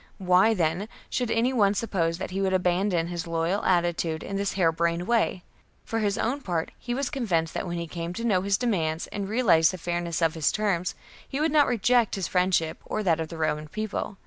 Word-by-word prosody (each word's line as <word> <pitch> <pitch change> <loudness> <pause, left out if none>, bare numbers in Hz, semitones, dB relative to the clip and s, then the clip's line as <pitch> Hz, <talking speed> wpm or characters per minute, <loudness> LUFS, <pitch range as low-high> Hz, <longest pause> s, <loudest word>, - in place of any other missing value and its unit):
Why, 190 +3 +4
then, 175 +4 0 0.2
should 245 -2 -1
any 235 +4 +1
one 205 -4 +3
suppose 170 -6 0
that 185 - -5
he 195 +1 -2
would 190 -1 +1
abandon 180 -1 +1
his 170 -1 -5
loyal 165 +4 0
attitude 170 -3 +1
in 195 - -5
this 200 0 -1
jiare 170 -4 +3
brained 170 +1 0
way? 225 -6 +1 0.4
For 225 - -2
his 205 -2 0
own 265 +5 -1
part, 170 -8 -2
he 240 -1 -3
was 275 0 -2
convinced 180 - 0
that - - -3
when 175 0 -3
he 170 - -3
came 170 +1 -5
to 230 - -4
know 200 -6 +2
his 200 +1 +1
demands 165 -10 -1
and 200 -1 -5
realized 190 -9 +4
the - - -5
fairness 175 -1 -2
of 165 -2 +2
his 160 -3 +1
terms, 195 -5 -1 0.3
he 270 - -3
would 315 +1 +1
not 295 -2 +5
reject 240 0 +2
his 190 -3 -2
friendship 180 -3 +1
or 215 - -3
that 165 -4 +2
of 160 - -2
the 165 - -8
Roman 155 -1 -1
People. 215 +2 -4
185 Hz, 220 wpm, -26 LUFS, 170-215 Hz, 0.4 s, not